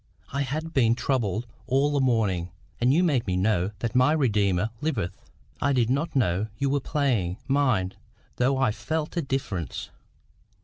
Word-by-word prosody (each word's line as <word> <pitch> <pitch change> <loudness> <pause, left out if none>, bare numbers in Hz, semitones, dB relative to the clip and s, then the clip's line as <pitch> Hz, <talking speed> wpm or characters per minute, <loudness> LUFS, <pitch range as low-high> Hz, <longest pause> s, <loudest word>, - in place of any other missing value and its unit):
I 140 - 0
had 155 +4 -3
been 115 -3 +4
troubled 120 -5 -1 0.2
all 135 +3 +2
the 145 - +1
morning; 105 -9 +1 0.3
and 125 +2 +3
you 165 +6 +4
made 140 -11 +1
me 90 -1 0
know 95 -1 +2
that 115 -1 -1
my 130 +4 +4
Redeemer 105 - +1
liveth. 120 - -1 0.5
I 140 - +2
did 120 -2 +2
not 145 +4 -1
know 105 -5 +1
you 140 -1 0
were 145 - +2
playing, 125 - 0
mind, 130 -10 +1 0.4
though 130 +2 +2
I 130 -4 +2
felt 155 +8 -3
a 170 - +1
difference. 130 - -3
125 Hz, 165 wpm, -26 LUFS, 105-140 Hz, 0.5 s, been